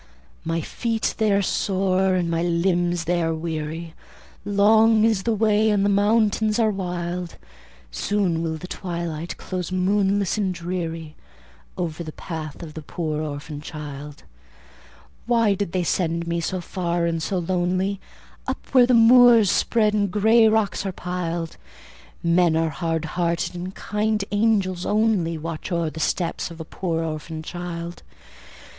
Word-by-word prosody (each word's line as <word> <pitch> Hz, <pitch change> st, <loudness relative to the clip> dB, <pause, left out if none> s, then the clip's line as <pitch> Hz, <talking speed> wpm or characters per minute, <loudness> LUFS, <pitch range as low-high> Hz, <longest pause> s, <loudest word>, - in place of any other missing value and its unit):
"My 165 Hz, 0 st, -1 dB
feet 225 Hz, -, -2 dB
they 215 Hz, -1 st, +3 dB
are 200 Hz, 0 st, +3 dB
sore, 190 Hz, 0 st, +1 dB
and 180 Hz, -2 st, 0 dB
my 165 Hz, 0 st, 0 dB
limbs 175 Hz, 0 st, +1 dB
they 175 Hz, +2 st, 0 dB
are 165 Hz, -1 st, 0 dB
weary; 160 Hz, 0 st, -4 dB, 0.5 s
Long 215 Hz, +2 st, +4 dB
is 220 Hz, -3 st, +3 dB
the 230 Hz, +2 st, 0 dB
way, 215 Hz, 0 st, +3 dB
and 200 Hz, -1 st, +2 dB
the -, -, +3 dB
mountains 210 Hz, +1 st, +2 dB
are 225 Hz, -2 st, +3 dB
wild; 180 Hz, -2 st, -4 dB, 0.6 s
Soon 190 Hz, -5 st, 0 dB
will 160 Hz, -1 st, -2 dB
the 160 Hz, -, -8 dB
twilight 170 Hz, -3 st, -4 dB
close 180 Hz, -2 st, -5 dB
moonless 195 Hz, +2 st, +1 dB
and 190 Hz, -3 st, 0 dB
dreary 165 Hz, -3 st, -4 dB, 0.6 s
Over 170 Hz, -2 st, -3 dB
the 155 Hz, -, -7 dB
path 160 Hz, -2 st, -7 dB
of 155 Hz, -2 st, -8 dB
the 160 Hz, -, -7 dB
poor 155 Hz, 0 st, -3 dB
orphan 145 Hz, 0 st, -6 dB
child. 150 Hz, -2 st, -8 dB, 1.0 s
Why 230 Hz, -4 st, +3 dB
did 195 Hz, -3 st, -3 dB
they 185 Hz, 0 st, 0 dB
send 170 Hz, -1 st, 0 dB
me 170 Hz, 0 st, -1 dB
so 185 Hz, +2 st, -2 dB
far 170 Hz, -1 st, -1 dB
and 165 Hz, -1 st, -1 dB
so 190 Hz, +4 st, -1 dB
lonely, 185 Hz, +2 st, 0 dB, 0.5 s
Up -, -, -4 dB
where 250 Hz, -2 st, +6 dB
the 250 Hz, -, +4 dB
moors 235 Hz, -3 st, +7 dB
spread 215 Hz, -2 st, +2 dB
and 205 Hz, -1 st, +1 dB
grey 220 Hz, +3 st, +5 dB
rocks 220 Hz, -3 st, +1 dB
are 195 Hz, -, -2 dB
piled? 175 Hz, -2 st, -4 dB, 0.7 s
Men 170 Hz, -1 st, +3 dB
are 165 Hz, 0 st, +1 dB
hard 165 Hz, +2 st, -2 dB
hearted, 170 Hz, +2 st, -1 dB
and 180 Hz, +2 st, -6 dB
kind 210 Hz, -1 st, -1 dB
angels 205 Hz, -4 st, +1 dB
only 205 Hz, -6 st, +1 dB
Watch 160 Hz, +2 st, -6 dB
o'er 170 Hz, -2 st, 0 dB
the 160 Hz, -, -8 dB
steps 170 Hz, +3 st, -1 dB
of 170 Hz, 0 st, -11 dB
a 160 Hz, -, -6 dB
poor 165 Hz, -1 st, -2 dB
orphan 155 Hz, 0 st, -5 dB
child. 175 Hz, 0 st, -6 dB
180 Hz, 150 wpm, -23 LUFS, 165-205 Hz, 1.0 s, moors